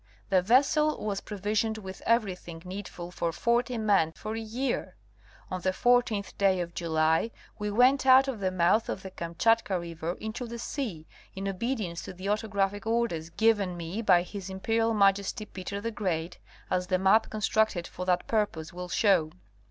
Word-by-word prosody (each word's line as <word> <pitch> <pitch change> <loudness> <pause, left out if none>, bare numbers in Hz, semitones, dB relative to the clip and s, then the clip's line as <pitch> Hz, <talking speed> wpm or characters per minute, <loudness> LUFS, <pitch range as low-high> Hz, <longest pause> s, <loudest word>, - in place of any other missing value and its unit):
The 190 -2 +4
vessel 280 +7 +3
was 200 -2 -2
pro 210 - -7
visioned 215 +3 0
with 190 -3 -8
everything 185 -7 0
needful 180 -2 -7
for 170 -2 -2
forty 235 +6 0
men 200 -7 +2
for 215 +5 -6
a - - -3
year. 235 +4 -3 0.6
On 185 -1 -3
the 185 - +1
14th 235 0 +1
day 195 -2 +3
of 170 -1 -4
July 160 +3 +1 0.3
we 210 0 -2
went 255 +5 +4
out 260 +1 +7
of 260 -5 -3
the 190 -1 0
mouth 185 +5 +2
of 190 - -4
the 190 - -7
Kamchatka 185 +4 +1
river 170 0 -4
into 220 +5 -6
the 235 +1 -6
sea, 220 - -4 0.3
in 195 +1 -4
obedience 195 -3 -2
to - - -8
the 185 +2 -5
autographic 205 0 -1
orders 225 -9 0
given 200 -3 +2
me 170 +6 -4
by 180 -5 +4
his 195 0 -7
Imperial 225 +4 0
Majesty 200 +2 +2
Peter 200 0 -6
the 230 +3 -3
Great, 175 -5 -3 0.3
as 180 0 0
the 185 - +2
map 195 +4 +4
con 215 - -5
structed 210 -4 +1
for 180 - -7
that 180 -1 +2
purpose 200 -8 -1
will 180 0 -6
show. 180 -6 +3
200 Hz, 175 wpm, -28 LUFS, 180-225 Hz, 0.6 s, out